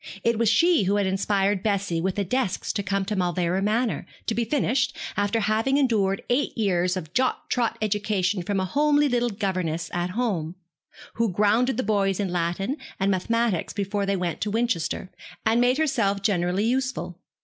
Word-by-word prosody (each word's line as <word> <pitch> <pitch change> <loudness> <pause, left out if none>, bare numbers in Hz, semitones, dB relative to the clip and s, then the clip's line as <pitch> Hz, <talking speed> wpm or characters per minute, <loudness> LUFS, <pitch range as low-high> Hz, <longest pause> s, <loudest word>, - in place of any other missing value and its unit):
It 230 -1 +1
was 230 -2 +3
she 325 - +4
who 200 +2 +2
had 205 -1 +1
inspired 195 +1 +1
Bessie 200 -5 0
with 190 +1 -1
the 205 - 0
desire 200 -1 -1
to 205 - -1
come 195 0 -1
to 210 +2 -2
Mauleverer 180 0 0
Manor, 220 +3 0 0.2
to 230 - 0
be 235 - 0
finished, 255 0 0 0.2
after 205 +3 +1
having 220 +6 +1
endured 210 -8 +1
eight 250 +2 0
years 185 -4 +1
of 165 -2 -7
jog 255 0 +2
trot 240 -2 0
education 205 -2 0
from 195 +2 -1
a 190 - 0
homely 290 +7 +3
little 245 -2 +1
governess 185 -6 -2
at 175 +1 -1
home 180 -9 -1 0.6
who 230 -3 +1
grounded 215 +6 +2
the 255 - 0
boys 200 -2 +1
in 195 -3 -1
Latin 180 - -1 0.2
and 195 +1 +2
mathematics 220 0 0
before 200 0 -2
they 200 - +1
went 180 -3 -3
to 210 - -1
Winchester, 210 -5 -1 0.3
and 225 +2 +3
made 250 +2 +3
herself 230 -11 +1
generally 185 -1 +1
useful. 245 -7 -2
205 Hz, 180 wpm, -25 LUFS, 185-235 Hz, 0.6 s, she